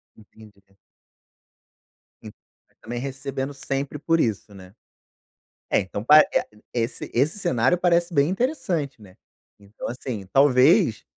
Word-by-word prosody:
Entendi. 105 -1 -18 1.6
En - - -9
e - - -27
também 120 +1 -6
recebendo 135 +1 -5
sempre 140 +1 -4
por 165 +2 +1
isso, 105 -5 -2
né. 95 -1 -14 1.0
É, - - +3
então 100 +2 -5
pa 150 +5 +8
e - - +4
a - - -6 0.3
esse 115 -1 -3
esse 145 - 0
cenário 130 - +1
parece 175 0 +1
bem 145 0 +3
interessante, 185 - -2
né. 95 -3 -16 0.4
Então 100 +1 -9
assim, 120 -4 -6
talvez, 130 -1 +4
135 Hz, 130 wpm, -23 LUFS, 110-150 Hz, 1.6 s, pa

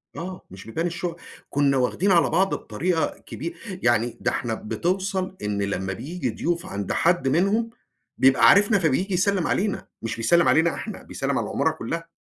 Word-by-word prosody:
آه 185 +2 -6
مش 95 0 -11
بيبان 165 +10 -2
الشقق. 170 0 -4 0.3
كنا 140 -1 +2
واخدين 165 +10 +1
على 170 -2 +4
بعض 190 +4 +2
بطريقة 160 +9 -1
كبي 170 +2 -6 0.3
يعني 120 0 +2
ده - - +1
إحنا 115 -2 -2
بتوصل 185 - -2
إن 105 -1 -2
لما 95 -1 -2
بييجي 155 - -4
ضيوف 170 +8 -2
عند 100 - -4
حد 175 -4 +2
منهم، 200 - +2 0.5
بيبقى 135 0 +5
عارفنا، 205 0 +5
فبييجي 180 +5 +1
يسلّم 190 0 +1
علينا، 200 +1 -1
مش 115 - -3
بيسلّم 170 +10 +3
علينا 165 +1 +4
إحنا، - - -7
بيسلّم - - -2
على - - -1
العمارة - - 0
كلها. 165 +8 -5
165 Hz, 165 wpm, -24 LUFS, 125-185 Hz, 0.5 s, بيبقى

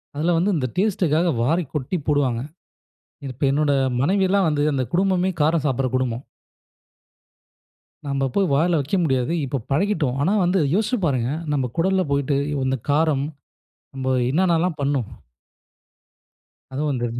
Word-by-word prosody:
அதுல 165 +4 +1
வந்து 190 +5 +2
இந்த 130 -3 -1
டேஸ்ட்க்காக 180 -4 +1
வாரி 165 +7 +1
கொட்டி 150 +5 -2
போடுவாங்க. 135 -5 +1 0.8
இது, 135 - -5
இப்ப 140 - -1
என்னோட 145 +1 +1 0.3
மனைவில்லாம் 190 +3 +2
வந்து 145 -1 0
அந்த 130 -1 0
குடும்பமே 185 0 +2
காரம் 155 0 +2
சாப்பட்ற 135 -2 0
குடும்பம். 130 0 -2 1.8
நம்ப 135 -1 0
போய் 195 -2 +2
வாயில 165 +3 +2
வைக்க 145 +8 -1
முடியாது. 130 +1 0
இப்ப 130 -1 -3
பழகிட்டோம். 150 -5 0
ஆனா, 175 +8 +2
வந்து 180 +1 +2
யோசிச்சு 220 +4 +1
பாருங்க. 125 -3 0 0.2
நம்ம 130 -4 -1
குடல்ல 190 +1 +2
போய்ட்டு 140 0 +1 0.3
இந்த 130 0 0
காரம். 145 -2 +2 0.7
நம்ம 130 0 -1 0.2
என்னன்னலாம் 170 -1 +1
பண்ணும்? 140 -5 0 1.7
அதுவும் 150 +3 -1
வந்து. 120 -2 -1
150 Hz, 135 wpm, -22 LUFS, 135-180 Hz, 1.8 s, வந்து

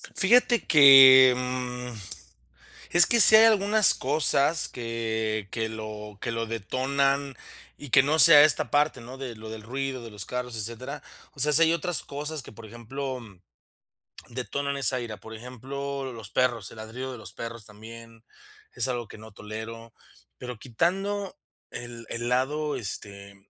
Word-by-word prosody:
Fíjate 240 +3 +3
que, 135 -3 +8
mm, 125 -1 -5 1.0
es 175 -2 +6
que 235 - +2
si 215 - +9
hay 220 - +7
algunas 210 0 +4
cosas 150 +2 +1
que 110 -3 -4
que 110 -1 -3
lo 105 -2 -9
que - - -4
lo 115 0 -3
detonan 135 +5 -2 0.4
y 145 -3 -12
que 135 +2 +5
no 155 +3 0
sea 155 -3 +8
esta 155 - +2
parte, 145 -2 0
¿no?, 125 +3 -11
de 125 -4 -7
lo 110 0 -10
del 110 -1 -9
ruido, 130 +2 -5
de 115 - -10
los 105 -3 -7
carros, 125 -2 -5
etcétera, 120 +7 -5 0.3
o 140 - -7
sea, 150 +2 +3
si 165 +3 +5
hay 165 - +4
otras 170 0 -3
cosas 150 +1 -5
que, - - -13
por 110 +1 -13
ejemplo, 130 +4 -7 1.1
detonan 140 +3 -4
esa 130 -1 +1
ira, 110 -3 -7
por 110 +3 -13
ejemplo, 135 +3 -7
los 110 -4 -10
perros, 120 -6 -1
el - - -14
ladrido 120 +4 -7
de 125 - -9
los 110 - -8
perros 115 -2 -8
también, 115 +2 -14 0.5
es - - 0
algo 120 -3 -4
que - - -13
no 110 0 -14
tolero, 110 +2 -9 0.4
pero 125 -3 -9
quitando 195 - -3 0.3
el 120 -1 -9
el 120 +1 -4
lado, 145 +4 -1
este, 100 -1 -8
125 Hz, 160 wpm, -25 LUFS, 115-140 Hz, 1.1 s, si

